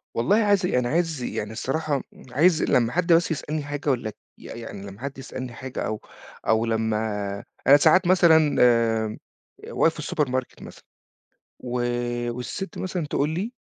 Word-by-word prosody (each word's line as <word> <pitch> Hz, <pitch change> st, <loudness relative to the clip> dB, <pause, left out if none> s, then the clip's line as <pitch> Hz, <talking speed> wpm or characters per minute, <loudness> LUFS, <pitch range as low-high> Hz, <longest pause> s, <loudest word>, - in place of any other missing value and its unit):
والله 120 Hz, -, +2 dB
عايز 200 Hz, -2 st, +3 dB
يعني 125 Hz, -8 st, +1 dB
عايز 165 Hz, -2 st, 0 dB
يعني 105 Hz, -3 st, -4 dB
الصراحة 140 Hz, +5 st, -2 dB, 0.3 s
عايز 155 Hz, +5 st, +3 dB
لمّا 120 Hz, -2 st, +2 dB
حد 175 Hz, +2 st, +2 dB
بس 165 Hz, +1 st, +3 dB
يسألني 155 Hz, 0 st, -3 dB
في 145 Hz, -, -9 dB
حاجة 145 Hz, 0 st, -3 dB
والّا 125 Hz, -5 st, 0 dB
ك 105 Hz, -, -12 dB, 0.2 s
ي -, -, -17 dB
يعني 105 Hz, -4 st, -8 dB
لمّا 100 Hz, +3 st, -11 dB
حد 140 Hz, 0 st, -5 dB
يسألني 130 Hz, -2 st, -7 dB
حاجة 130 Hz, +2 st, -7 dB
أو 110 Hz, -, -3 dB, 0.5 s
أو 110 Hz, +1 st, +3 dB
لمّا 110 Hz, -1 st, 0 dB, 0.7 s
أنا 140 Hz, -, +9 dB
ساعات 165 Hz, +5 st, +4 dB
مثلًا 175 Hz, -3 st, +6 dB, 0.7 s
آمم، 110 Hz, 0 st, -5 dB, 0.5 s
آآ -, -, -9 dB
واقف 165 Hz, -, +3 dB
في -, -, -11 dB
السوبر 155 Hz, -2 st, -1 dB
ماركت 130 Hz, 0 st, -3 dB
مثلًا -, -, -12 dB, 0.8 s
و 125 Hz, 0 st, -3 dB, 0.5 s
والسِت 125 Hz, -, -6 dB
مثلًا 180 Hz, -4 st, -3 dB
تقول 145 Hz, +1 st, 0 dB
لي 190 Hz, +9 st, -3 dB
140 Hz, 170 wpm, -24 LUFS, 120-165 Hz, 0.8 s, أنا